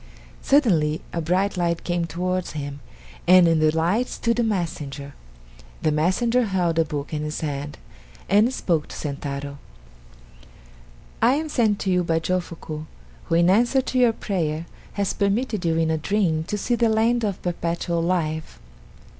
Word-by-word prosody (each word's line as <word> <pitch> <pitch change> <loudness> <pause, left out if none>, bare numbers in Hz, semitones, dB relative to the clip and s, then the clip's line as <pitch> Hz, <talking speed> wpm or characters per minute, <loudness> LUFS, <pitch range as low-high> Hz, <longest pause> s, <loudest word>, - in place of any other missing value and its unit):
Suddenly 170 - +3
a 170 - -1
bright 185 +4 0
light 170 -1 0
came 175 -1 -1
towards 180 +2 -2
him, 145 -2 -5 0.5
and 180 -1 +7
in 165 -1 +3
the 155 0 +4
light 170 +10 +1
stood 235 0 -1
a - - +3
messenger. 150 -9 -3 0.7
The 155 - +3
messenger 230 +11 +2
held 175 -5 0
a 165 - +3
book 150 0 -5
in 150 - -1
his 150 0 -4
hand 145 -1 -4 0.5
and 210 +5 +4
spoke 170 -11 -1
to - - -9
Sentaro: 140 -1 -5 1.6
"I 240 +4 +5
am 310 +1 -2
sent 220 -7 +2
to 190 - 0
you 180 -1 +2
by 165 -1 +1
Jofuku, 165 -3 -3 0.4
who - - 0
in 170 +1 +4
answer 235 +8 +4
to 255 - -1
your 240 -2 +5
prayer, 165 -7 -2 0.3
has 200 -2 -1
permitted 205 -1 0
you 165 -1 +2
in 165 -1 +2
a 160 - 0
dream 165 -3 0
to 210 - -3
see 225 +4 -1
the 235 -1 +3
land 225 +2 +2
of 200 -4 -1
Perpetual 170 -1 -1
Life. 160 -3 -1
175 Hz, 165 wpm, -23 LUFS, 155-210 Hz, 1.6 s, and